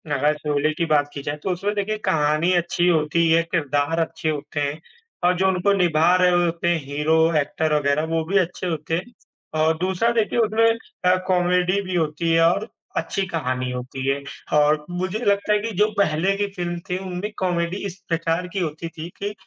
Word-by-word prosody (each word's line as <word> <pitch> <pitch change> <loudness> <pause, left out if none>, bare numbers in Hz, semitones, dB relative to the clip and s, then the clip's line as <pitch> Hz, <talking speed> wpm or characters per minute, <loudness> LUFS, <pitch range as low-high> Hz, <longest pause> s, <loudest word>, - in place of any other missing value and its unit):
अगर 150 +3 +2
शोले 150 +1 0
की 170 - -1
बात 145 -2 +2
की 140 - -5
जाए 145 - -2
तो 190 - 0
उसमें 200 +4 -1
देखिए 205 +1 -1
कहानी 155 +3 +2
अच्छी 175 0 +1
होती 160 -1 +2
ही 160 - +3
है, 165 +1 +4
किरदार 145 0 0
अच्छे 165 -1 -2
होते 145 0 -4
हैं 145 +2 -2 0.4
और 180 +1 +4
जो 190 - +2
उनको 190 +1 +2
निभा 175 -2 +3
रहे 180 0 +5
होते 170 0 -2
हैं, 170 -2 +2
हीरो, 160 +3 +2
एक्टर 150 +2 -1
वग़ैरह 145 +1 +1
वो 160 - +1
भी 195 +4 +1
अच्छे 180 0 -1
होते 160 0 -2
हैं 215 +8 -5 0.5
और 160 0 +2
दूसरा 190 +6 +1
देखिए 235 - -1
उसमें 225 0 +3 0.4
अ, 180 0 +5
कॉमेडी 180 +1 +2
भी 185 -2 -4
होती 165 0 0
है 165 - +4
और 205 +5 -1 0.3
अच्छी 195 - -1
कहानी 130 -6 -2
होती 130 +1 -5
है 140 +1 +1 0.3
और 150 0 +3
मुझे 185 +4 -3
लगता 200 +1 +2
है 210 - +4
कि 225 +2 -4
जो 210 - +5
पहले 195 0 +2
की 205 - 0
फ़िल्म 175 -1 -3
थी 180 - 0
उनमें 185 +3 -4
कॉमेडी 175 0 0
इस 185 -2 -5
प्रकार 165 +1 0
की 195 - -1
होती 165 0 -3
थी 160 +2 -5
कि 205 +1 -2
170 Hz, 200 wpm, -22 LUFS, 155-185 Hz, 0.5 s, रहे